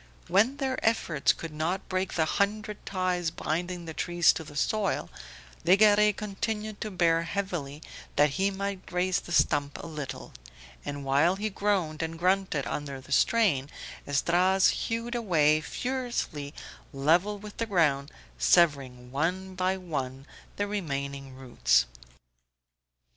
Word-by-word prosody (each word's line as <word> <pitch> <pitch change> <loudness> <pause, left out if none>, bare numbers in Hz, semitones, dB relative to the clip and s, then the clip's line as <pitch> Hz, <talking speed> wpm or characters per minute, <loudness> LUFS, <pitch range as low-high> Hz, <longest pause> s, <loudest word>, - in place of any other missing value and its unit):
When 220 +9 +3
their 265 -2 -2
efforts 170 -10 +2
could 165 -2 -7
not 170 +5 -2
break 185 -1 -2
the 160 - +2
hundred 210 +4 -1
ties 180 -3 0
binding 175 +2 -3
the 160 - -6
tree 175 +2 -4
to 160 - +5
the 145 -1 -12
soil 200 - 0 0.5
Legare 210 +4 +6
continued 210 +1 -4
to 215 - -2
bear 170 -4 +2
heavily 165 -5 -4 0.3
that 145 0 +4
he 195 +6 +1
might 200 -1 -5
raise 180 +1 +1
the - - -11
stump 145 -4 +2
a - - -8
little, 150 -6 -7 0.5
and 145 -1 -5
while 145 +7 +3
he 210 +2 -3
groaned 190 -7 0
and 165 0 -3
grunted 185 -4 +1
under 140 -2 -4
the 130 +1 -15
strain 145 -7 +3 0.4
Esdras 180 +6 +3
hewed 230 +1 -2
away 155 -10 +3
furiously 235 - -3 0.4
level 165 +9 +2
with 210 +1 -11
the 230 - -1
ground, 150 -8 +1 0.3
severing 125 - +2
one 180 +7 -1
by 185 +1 0
one 135 -7 -5 0.3
the 205 - -1
remaining 140 -9 -4
roots. 65 - +2
175 Hz, 135 wpm, -28 LUFS, 145-200 Hz, 0.5 s, Legare